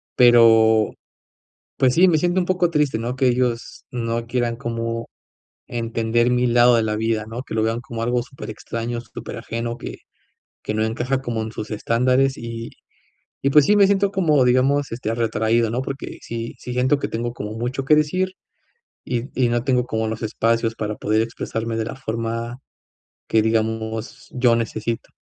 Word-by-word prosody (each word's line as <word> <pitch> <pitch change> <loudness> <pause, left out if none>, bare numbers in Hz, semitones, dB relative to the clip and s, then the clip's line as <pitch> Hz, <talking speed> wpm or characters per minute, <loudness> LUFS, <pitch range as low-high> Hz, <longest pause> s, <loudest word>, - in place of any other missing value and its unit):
Pero, 115 -3 +6 0.9
pues, 130 -1 +3
sí, 185 +3 +6
me 160 - +3
siento 175 +3 +1
un - - -1
poco 180 -1 +2
triste, 150 -7 +1
¿no? 120 +2 -3
Que 130 0 +2
ellos 120 -1 -1
no 115 -1 -2
quieran 120 -1 -1
como, 115 0 -3 0.6
entender 115 0 0
mi 125 0 +2
lado 120 0 +5
de 115 - +2
la 105 -1 -1
vida, 110 0 -1
¿no? 115 +2 -5
Que - - -8
lo 110 - +2
vean 115 +1 0
como 115 -2 -5
algo 120 +1 +1
súper 125 -1 -10
extraño, 115 +2 -4
súper - - -8
ajeno, 115 +1 -4
que, - - -7 0.7
que - - -2
no 110 0 +1
encaja 125 +4 -1
como 120 -4 -3
en 110 - -6
sus 110 -1 -6
estándares, 125 +5 +2
y, 115 0 -6 0.7
y 140 - +2
pues, 150 0 +6
sí, 210 - +4
me 205 -1 +6
siento 195 0 +2
como 155 -8 +3
digamos, 135 +3 +2
este, 115 -2 -3
retraído, 115 0 +1
¿no? 120 +3 -1
Porque 135 0 -6
sí 115 0 -5
sí 125 - -7
siento 130 +4 +2
que - - -2
tengo 120 +1 -3
como 105 -3 -6
mucho 120 +4 -3
que 150 - +6
decir 185 +5 +1 0.8
y 125 +2 -2
y 125 - +4
no 120 0 0
tengo 125 -2 +2
como 110 -3 -2
los 110 0 -5
espacios 115 +1 0
para 105 -1 -3
poder 110 +2 +1
expresarme 115 0 -3
de 110 - -1
la 115 - -6
forma 115 -1 -4 0.7
que 110 - +3
digamos, 110 +2 -2
yo 125 -2 +3
necesito. 115 0 -3
115 Hz, 180 wpm, -22 LUFS, 115-130 Hz, 0.9 s, Pero